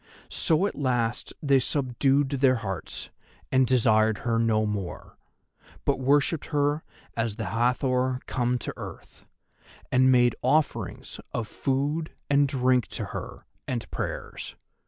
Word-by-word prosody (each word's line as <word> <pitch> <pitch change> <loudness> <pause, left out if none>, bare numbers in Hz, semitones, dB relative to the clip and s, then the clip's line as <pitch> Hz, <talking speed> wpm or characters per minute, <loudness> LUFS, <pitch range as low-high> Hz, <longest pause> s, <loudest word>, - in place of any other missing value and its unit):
So 165 +3 +2
at 205 - -1
last 120 -4 -1
they 140 -2 +5
subdued 135 +1 +1
their 135 -2 +3
hearts, 95 -6 -5 0.4
and 130 -1 +4
desired 110 -3 +3
her 115 -1 +2
no 110 -1 +2
more, 100 -4 -5 0.7
but - - +1
worshipped 145 +3 +2
her 145 0 +1 0.3
as 115 -2 -1
the 115 -1 -4
Hathor 125 +4 +1
come 125 -1 0
to - - -5
earth, - - -10 0.7
and 130 +1 +5
made 120 -2 +4
offerings 145 +3 0 0.2
of 115 -2 -2
food 145 +6 -1 0.2
and 140 0 +5
drink 130 -3 +2
to - - -4
her, - - -7 0.2
and 120 -3 -3
prayers. - - -5
130 Hz, 130 wpm, -27 LUFS, 115-140 Hz, 0.7 s, they